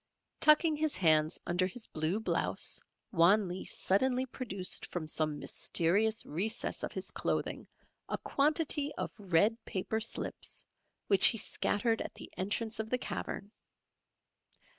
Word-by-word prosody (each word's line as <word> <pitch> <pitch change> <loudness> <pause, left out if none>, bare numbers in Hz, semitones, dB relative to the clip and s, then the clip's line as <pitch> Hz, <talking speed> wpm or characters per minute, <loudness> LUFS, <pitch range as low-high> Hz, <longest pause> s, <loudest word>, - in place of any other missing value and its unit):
] - - -54
Tucking 305 0 +4
his 310 -1 -1
hands 155 -2 +3
under 180 +1 0
his 225 +5 -6
blue 160 +6 -1
blouse, 220 - 0 0.3
Wan 190 +4 +4
Lee 180 +1 -6
suddenly 255 +6 +1
produced 220 -8 -2
from 170 -3 -5
some 155 -1 -1
mysterious 200 +9 +1
recess 200 +9 -1
of - - -4
his - - -5
clothing - - -3 0.4
a - - -2
quantity 295 0 +2
of - - -4
red 205 +4 +1
paper 200 +3 -3
slips 230 - -2 0.4
which 195 -2 +7
he 225 - +4
scattered 225 +2 0
at - - -7
the - - -9
entrance 215 +4 -3
of 220 0 -4
the 250 - +1
cavern. 205 -4 -6
205 Hz, 140 wpm, -32 LUFS, 180-245 Hz, 0.4 s, which